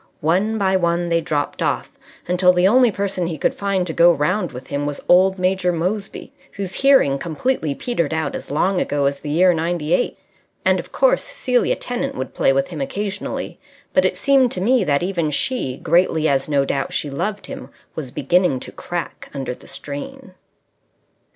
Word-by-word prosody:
One 190 +8 +1
by 190 -2 +2
one 170 -1 0
they 165 0 +2
dropped 145 -2 -2
off, - - -1 0.4
until 180 +1 +4
the 180 +1 +4
only 245 +2 +5
person 195 -3 -2
he 165 -2 -4
could - - +1
find 195 -2 -1
to 165 - -4
go 170 +2 +6
round 170 +7 0
with 125 +1 -9
him 145 +1 -3
was 145 - -5
old 190 +2 +5
Major 185 0 +1
Moseby, 185 +5 -3 0.2
whose 195 -2 -5
hearing 270 - +4
completely 160 - -1
petered 170 -11 -2
out 160 -3 -1
as - - -7
long 180 +6 +1
ago 145 -1 0
as 140 0 0
the 150 - -7
year 180 +4 +4
'98. 170 +4 0 0.5
And, - - +3
of - - -8
course, - - +2
Celia 275 - 0
Tennant 245 -1 -3
would 130 - -5
play - - +3
with 135 0 0
him 160 -5 -6
occasionally; 200 +7 -4 0.3
but - - +4
it - - +1
seemed 270 -3 +3
to - - -2
me 240 +3 +3
that 145 +1 +1
even 175 -4 -1
she, 150 - -1
greatly 165 -2 +2
as 135 0 0
no 140 -2 +2
doubt 135 0 -2
she 145 - -2
loved 195 +8 -3
him, - - -8 0.2
was 145 -5 -6
beginning 155 +2 +1
to - - -9
crack 175 -1 -6
under 135 -2 -3
the - - -15
strain. 190 - -7
175 Hz, 185 wpm, -20 LUFS, 150-195 Hz, 0.5 s, go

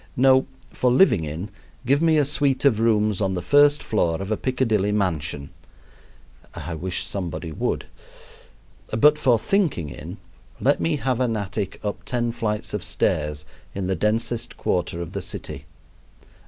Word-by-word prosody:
No, 130 +1 +5 0.2
for 125 - +1
living 120 - +4
in 80 +7 -5 0.4
give 140 +4 +3
me 160 -1 +4
a 145 - +3
suit 140 -1 +1
of 120 -6 +4
rooms 105 -3 +2
on 95 -2 0
the 90 - -2
first 145 0 +5
floor 85 -7 0
of 95 +2 -5
a - - +3
Piccadilly 115 -5 0
mansion 80 -8 -1 1.0
(I 80 +3 -5
wish 90 +3 -3
somebody 90 -3 -4
would!); - - -2 1.0
but 150 +7 +4
for 125 -5 +4
thinking 150 - 0
in 60 - -8 0.4
let 140 +2 +2
me 165 -2 +1
have 130 -4 -1
an 120 -3 +1
attic 100 -1 -4
up 105 -1 -4
ten 120 -1 -1
flights 105 -2 -3
of - - -2
stairs 75 0 -1 0.3
in 95 -1 -2
the 95 - 0
densest 115 +3 -1
quarter 85 -1 -1
of 85 - -9
the 100 - -4
city. 75 -5 -7
105 Hz, 155 wpm, -23 LUFS, 90-130 Hz, 1.0 s, No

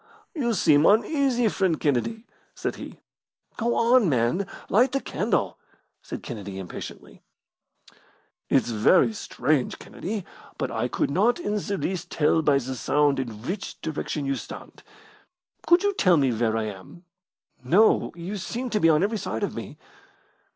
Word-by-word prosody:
"You 240 -8 0
seem 155 -4 +4
uneasy, 245 +1 +3
friend 190 -6 0
Kennedy," 155 - -1 0.3
said - - -3
he. - - -9 0.6
"Go 235 +1 0
on, 235 -4 +4
man, 125 +9 +1 0.2
light 245 +7 +3
the 275 - +1
candle!" - - -1 0.4
said - - -7
Kennedy, 100 -6 -7
impatiently. 95 -2 -9 1.3
"It's - - +2
very 145 - +4
strange, 145 -8 -1
Kennedy, 200 +1 -6 0.3
but - - -2
I - - -1
could - - -1
not 215 - +2
in 210 - -2
the 200 0 -3
least 185 -2 -3
tell 160 +1 +2
by 145 -3 +3
the 130 0 -3
sound 145 +2 +1
in 115 -4 -5
which 190 +8 -5
direction 150 -1 -3
you 135 - 0
stand. - - -9 0.9
Could 345 +3 +5
you 405 0 +2
tell 180 - +4
where 120 -4 +1
I 110 - -1
am?" 105 - -9 0.6
"No; 185 - +4
you 175 +5 -5
seem 240 +6 -4
to 210 - +1
be 165 - +4
on 155 +2 +4
every 215 +2 0
side - - -4
of - - -2
me." - - -7
175 Hz, 150 wpm, -25 LUFS, 135-220 Hz, 1.3 s, Could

